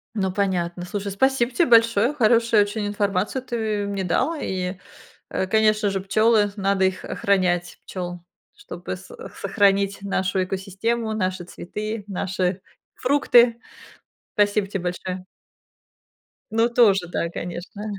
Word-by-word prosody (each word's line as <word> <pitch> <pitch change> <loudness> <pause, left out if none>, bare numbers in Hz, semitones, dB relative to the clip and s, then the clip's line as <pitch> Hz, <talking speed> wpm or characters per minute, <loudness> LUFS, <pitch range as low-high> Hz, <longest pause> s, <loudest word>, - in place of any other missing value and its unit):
Ну 190 -3 0
понятно, 180 -3 -1
слушай, 200 +1 -4
спасибо 255 +3 +2
тебе 330 +8 +2
большое, 230 +2 +4
хорошую 230 -4 +4
очень 205 0 -3
информацию 205 +4 -1
ты 220 -4 -2
мне 200 -1 -3
дал, 260 - +1
и, 185 0 -3 0.5
э, 190 - -2
конечно 215 0 +3
же, 195 - -1
пчёлы, 210 +1 +3
надо 195 -1 +1
их 190 0 -2
охранять, 180 -3 0
пчёл, 175 -1 -5 0.4
чтобы 410 - -7
с - - -14 0.3
сохранить 200 -1 +2
нашу 190 -1 0
экосистему, 205 +5 -2
наши 185 -3 -2
цветы, 210 +4 -6
наши 185 -1 -2 0.3
фрукты. 245 -3 +4 0.7
Спасибо 205 -1 +2
тебе 195 -3 -4
большое. 180 +1 -4 1.3
Ну, 225 +1 +3
тоже, 200 -7 +4
да, 170 -1 -2
конечно. 175 +4 -7
200 Hz, 125 wpm, -23 LUFS, 185-225 Hz, 1.3 s, большое